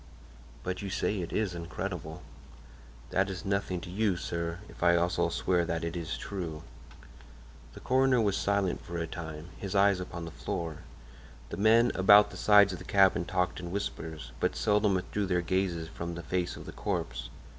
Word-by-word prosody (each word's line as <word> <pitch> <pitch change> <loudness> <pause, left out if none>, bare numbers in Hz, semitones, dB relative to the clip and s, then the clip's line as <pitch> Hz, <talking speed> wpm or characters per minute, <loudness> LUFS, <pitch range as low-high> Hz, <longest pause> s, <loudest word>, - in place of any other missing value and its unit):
"But 90 0 -3
you 100 - -4
say 100 0 -1
it 85 - -5
is 105 -4 0
incredible." 85 -1 -5 0.9
"That 95 +1 +2
is 95 -2 -6
nothing 100 -2 -1
to 90 - -8
you, 100 -1 +1
sir, 85 -1 -3
if - - -14
I 85 0 +5
also 85 +1 +1
swear 90 -2 +1
that 85 -1 -2
it 85 +1 -3
is 85 -1 -3
true." 85 -6 -5 1.1
The - - -11
coroner 130 0 +3
was 100 -3 +2
silent 100 -3 0
for 85 - -6
a 85 - -1
time, 80 -1 -7
his 100 0 -5
eyes 100 -1 +4
upon 85 -2 -6
the 85 - -7
floor. 80 +3 -4 0.7
The - - -5
men 115 +3 +5
about 105 +2 +7
the - - -8
sides 100 -2 +6
of 90 - -6
the - - -9
cabin 95 -3 +4
talked 90 0 -1
in 90 - -6
whispers, 80 -8 -5
but - - 0
seldom 105 -1 +2
withdrew 100 +2 -2
their 90 -1 +1
gaze 85 -2 -1
from 85 0 -5
the 85 - -6
face 90 +3 -1
of - - -9
the - - -7
corpse. - - -3
90 Hz, 185 wpm, -30 LUFS, 85-100 Hz, 1.1 s, about